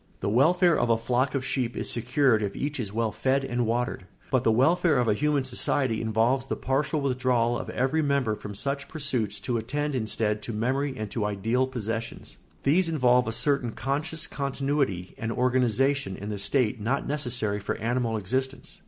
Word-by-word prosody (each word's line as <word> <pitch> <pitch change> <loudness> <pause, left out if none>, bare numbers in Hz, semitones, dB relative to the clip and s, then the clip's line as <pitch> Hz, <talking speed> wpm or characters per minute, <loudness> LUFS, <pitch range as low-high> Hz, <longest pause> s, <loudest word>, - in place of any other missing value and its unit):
The - - -1
welfare 170 - +4
of 120 - +1
a 115 - +4
flock 125 +4 0
of 130 -1 -1
sheep 130 -2 -2
is - - -3
secured 125 -1 +2
if 100 -2 -2
each 145 0 -3
is 105 -5 -3
well 110 0 0
fed 135 +3 0
and 120 -2 -1
watered, 115 -5 -1 0.2
but 130 -2 +2
the 115 - +4
welfare 160 +6 +3
of 125 -1 +2
a 105 - +4
human 145 +3 +1
society 130 -2 0
involves 115 +4 +1
the - - -1
partial 145 +3 0
withdrawal 125 -3 +1
of - - -5
every 135 +5 +1
member 140 -6 +1
from 105 -1 -8
such 140 +6 -3
pursuits 125 -10 -2
to 120 +3 -1
attend 145 +6 -2
instead 110 -3 -1
to 115 - -5
memory 130 +5 -1
and 110 -1 -5
to 110 -3 -1
ideal 110 +6 0
possessions; 115 -2 -5 0.3
these 165 +5 +3
involve 125 -5 +3
a - - 0
certain 130 -1 0
conscious 150 +5 -1
continuity 140 -9 -1
and 115 0 -2
organisation 125 -1 +1
in 100 +2 -6
the 105 -1 -3
state 110 +2 +1
not 130 +6 -1
necessary 120 -8 -1
for 100 - -3
animal 115 -1 -1
existence. 130 +5 -3
125 Hz, 185 wpm, -27 LUFS, 110-140 Hz, 0.3 s, welfare